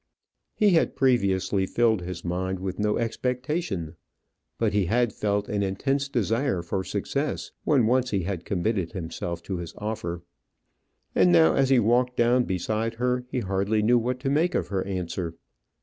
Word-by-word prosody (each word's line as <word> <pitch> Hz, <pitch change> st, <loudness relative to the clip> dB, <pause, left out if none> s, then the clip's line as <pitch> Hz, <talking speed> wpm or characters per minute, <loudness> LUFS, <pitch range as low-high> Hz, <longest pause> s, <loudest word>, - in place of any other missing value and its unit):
He 210 Hz, -2 st, +4 dB
had 165 Hz, -, +2 dB
previously 100 Hz, -6 st, +2 dB
filled 115 Hz, -3 st, +2 dB
his 90 Hz, -1 st, -6 dB
mind 95 Hz, +2 st, -2 dB
with 95 Hz, +1 st, -5 dB
no 105 Hz, 0 st, +1 dB
expectation; 120 Hz, -, -2 dB, 0.6 s
but -, -, +1 dB
he 100 Hz, -4 st, +2 dB
had 120 Hz, +2 st, +1 dB
felt 105 Hz, -1 st, -1 dB
an 105 Hz, -1 st, -1 dB
intense 135 Hz, +9 st, -1 dB
desire 115 Hz, -4 st, 0 dB
for 95 Hz, +2 st, -2 dB
success 105 Hz, +10 st, -3 dB
when 135 Hz, -6 st, +4 dB
once 125 Hz, +2 st, +2 dB
he 100 Hz, -3 st, 0 dB
had 90 Hz, -1 st, -3 dB
committed 95 Hz, -2 st, -1 dB
himself 85 Hz, -1 st, -5 dB
to 95 Hz, 0 st, -4 dB
his 85 Hz, -2 st, -7 dB
offer. 90 Hz, -5 st, -4 dB, 0.9 s
And 90 Hz, -1 st, +4 dB
now, 80 Hz, -2 st, +6 dB
as 135 Hz, -1 st, +2 dB
he 135 Hz, -, +5 dB
walked 125 Hz, +3 st, +2 dB
down 120 Hz, +1 st, +3 dB
beside 110 Hz, +5 st, -2 dB
her, 125 Hz, +1 st, 0 dB
he 125 Hz, -, -2 dB
hardly 100 Hz, +2 st, 0 dB
knew 120 Hz, +3 st, +4 dB
what 125 Hz, +2 st, -2 dB
to 135 Hz, 0 st, 0 dB
make 165 Hz, +5 st, +2 dB
of -, -, -1 dB
her 95 Hz, -2 st, -1 dB
answer. 90 Hz, -3 st, -3 dB
105 Hz, 165 wpm, -26 LUFS, 95-125 Hz, 0.9 s, now